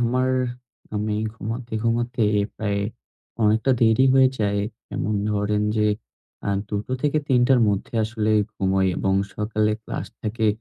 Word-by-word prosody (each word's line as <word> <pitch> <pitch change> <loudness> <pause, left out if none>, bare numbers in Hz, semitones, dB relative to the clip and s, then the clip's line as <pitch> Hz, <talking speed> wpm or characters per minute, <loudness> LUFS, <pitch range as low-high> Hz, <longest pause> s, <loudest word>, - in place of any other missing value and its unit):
আমার 125 +2 +1 0.6
আমি 105 0 -1 0.2
ঘুমাতে, 115 +2 -6
ঘুমাতে 120 +1 0 0.3
প্রায় 100 -2 -1 0.6
অনেকটা 110 +4 +3
দেরি 110 +3 +5
হয়ে 130 -1 +6
যায়। 100 -1 +1 0.3
যেমন 105 - -2 0.2
ধরেন 105 0 0
যে, 105 0 +3 0.6
আ - - 0 0.2
২ 105 - -1
টো - - -5
থেকে 150 +1 +2
৩ 125 -2 +4
টার 130 -2 +5
মধ্যে 100 +3 -2
আসলে 110 -1 -1 0.2
ঘুমোই 95 -1 +1
এবং 95 0 +1 0.2
সকালে 105 0 +1
ক্লাস - - -5
থাকে। 110 +1 -1
110 Hz, 140 wpm, -23 LUFS, 105-120 Hz, 0.6 s, হয়ে